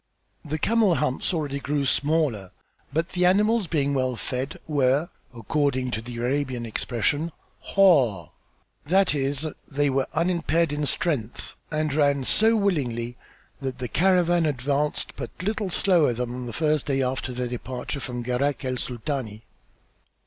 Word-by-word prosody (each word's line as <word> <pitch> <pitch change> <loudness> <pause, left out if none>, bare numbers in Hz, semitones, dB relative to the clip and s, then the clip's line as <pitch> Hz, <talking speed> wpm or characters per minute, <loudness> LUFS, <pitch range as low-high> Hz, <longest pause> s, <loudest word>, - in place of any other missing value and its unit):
The 155 0 -3
camel 215 0 +3
humps 140 -2 0
already 145 -5 -2
grew 140 0 -1
smaller 140 - +1 0.4
but 160 +3 0
the 180 0 0
animals, 210 +3 +3
being 145 -3 0
well 130 -2 0
fed, 130 +3 -4
were, 145 +1 +2 0.2
according 130 +1 -1
to 110 - -2
the 120 +1 -8
Arabian 125 0 -1
expression, 125 +8 -1 0.4
"harde," 130 - +4 0.5
that 190 +2 +3
is, 140 +1 0 0.2
they 145 0 +1
were 135 0 +1
unimpaired 170 -1 +1
in 145 0 -1
strength 135 -11 -2 0.2
and 155 -2 0
ran 140 -2 +2
so 220 - +4
willingly 125 - 0 0.5
that 130 -2 -3
the 125 - -3
caravan 175 0 +3
advanced 145 +2 -1
but 120 - -5
little 210 0 -1
slower 170 -7 +3
than 120 +1 -3
on 125 0 -5
the - - -5
first 155 +1 +1
day 135 -1 +1
after 130 0 -2
their 125 0 -3
departure 125 +3 -5
from 125 -2 -5
Gharak 135 +3 -1
el 130 -1 -1
Sultani. 120 -3 -4
140 Hz, 145 wpm, -25 LUFS, 125-160 Hz, 0.5 s, harde